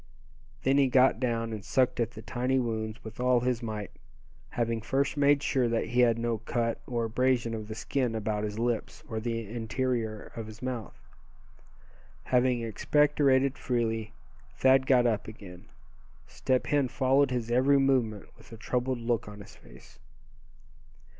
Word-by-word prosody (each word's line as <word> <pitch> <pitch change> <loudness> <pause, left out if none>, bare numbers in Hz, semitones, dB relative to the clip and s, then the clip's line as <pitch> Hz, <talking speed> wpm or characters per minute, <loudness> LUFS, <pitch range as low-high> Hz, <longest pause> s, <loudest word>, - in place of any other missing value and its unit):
Then 135 +2 +3
he 135 - +4
got 130 -2 +4
down, 115 -2 -1
and 105 -2 -6
sucked 125 +3 +1
at 115 -2 +1
the 110 -2 -11
tiny 130 +1 -1
wounds 110 -3 -3
with 110 +1 -10
all 125 -1 +3
his 125 -1 0
might, 105 -3 -5 0.6
having 115 -1 -1
first 135 +6 0
made 145 0 +3
sure 130 -3 +1
that 115 0 -1
he 120 - 0
had 120 -2 +4
no 115 -1 -1
cut, 115 +1 -2
or 120 -2 -1
abrasion 120 0 +1
of 110 -1 -5
the 110 - -6
skin 125 0 -1
about 105 -1 -2
his 105 0 -4
lips, 120 -1 -2
or 110 - -3
the 115 -1 -3
interior 115 0 -3
of 115 -2 -6
his 110 +1 -11
mouth. 125 -4 -5 1.2
Having 125 -1 +2
expectorated 140 +3 +2
freely 115 -3 -1 0.4
Thad 130 0 +4
got 125 -2 +4
up 110 -3 0
again. 95 -5 -11 0.6
Step 130 -1 -1
Hen 145 -2 +1
followed 135 +2 +2
his 120 -2 -3
every 130 +3 +4
movement 125 -7 +1
with - - -19
a 115 - -9
troubled 125 +3 -1
look 115 -1 -1
on 105 0 -10
his 100 - -13
face. - - -17
120 Hz, 160 wpm, -29 LUFS, 110-130 Hz, 1.2 s, he